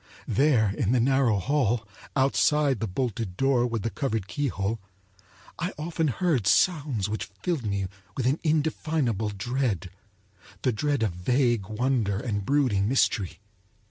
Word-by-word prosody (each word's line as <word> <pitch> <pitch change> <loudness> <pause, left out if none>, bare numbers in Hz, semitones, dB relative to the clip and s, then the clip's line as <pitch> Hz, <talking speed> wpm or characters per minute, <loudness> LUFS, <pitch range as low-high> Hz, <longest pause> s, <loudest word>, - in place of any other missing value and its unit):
There 125 -8 +3
in 105 +2 0
the 125 - +3
narrow 130 -3 +3
hall, 120 -1 0 0.3
outside 140 0 +3
the 110 - -1
bolted 105 -2 -3
door 135 -3 +3
with 115 -3 -3
the 115 - -1
covered 110 -2 -2
keyhole, 110 - -2 0.8
I 180 +3 -2
often 160 +1 -1
heard 140 - +1
sounds 140 - +2
which 110 +1 -4
filled 160 -11 -1
me 100 -1 -1 0.3
with 130 - -1
an 135 +5 +2
indefinable 150 - 0
dread—the 100 -2 -4
dread 140 +2 0
of 105 - +1
vague 120 +2 +1
wonder 110 -3 0
and 105 -5 -2
brooding 115 -6 +2
mystery. 105 -7 +1
120 Hz, 135 wpm, -26 LUFS, 100-140 Hz, 0.8 s, There